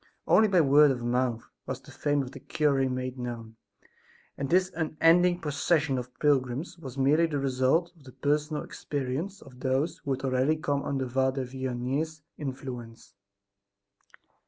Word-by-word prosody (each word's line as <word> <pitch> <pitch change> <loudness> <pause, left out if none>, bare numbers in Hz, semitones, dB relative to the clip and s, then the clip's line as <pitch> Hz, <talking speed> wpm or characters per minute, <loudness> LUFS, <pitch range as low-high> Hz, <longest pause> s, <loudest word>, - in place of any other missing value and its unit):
Only 220 - +5
by 185 -4 +4
word 145 0 +6
of 125 -3 -1
mouth 120 -1 0 0.2
was 130 0 -3
the 145 - -15
fame 145 +1 0
of 130 - -8
the 140 - -10
cure 135 -1 +1
made 130 0 -4
known, 115 -2 -6 0.8
and 140 -1 -4
this 185 +3 +3
unending 165 +2 +3
procession 145 -1 +1
of 125 0 -7
pilgrims 145 +3 +1
was 135 -5 -8
merely 150 +5 +4
the 150 -3 -2
result 135 +6 +1
of 150 -5 -21
the 130 - -11
personal 150 +3 -1
experience 145 +8 -4
of 130 -3 -15
those 140 +6 0
who 145 - -8
had 130 +1 -5
already 130 +4 +2
come 145 -2 -1
under 135 -2 -2
Father 130 +1 0
Vianney's 130 +4 -3
influence. 125 -4 -7
135 Hz, 155 wpm, -28 LUFS, 130-155 Hz, 0.8 s, word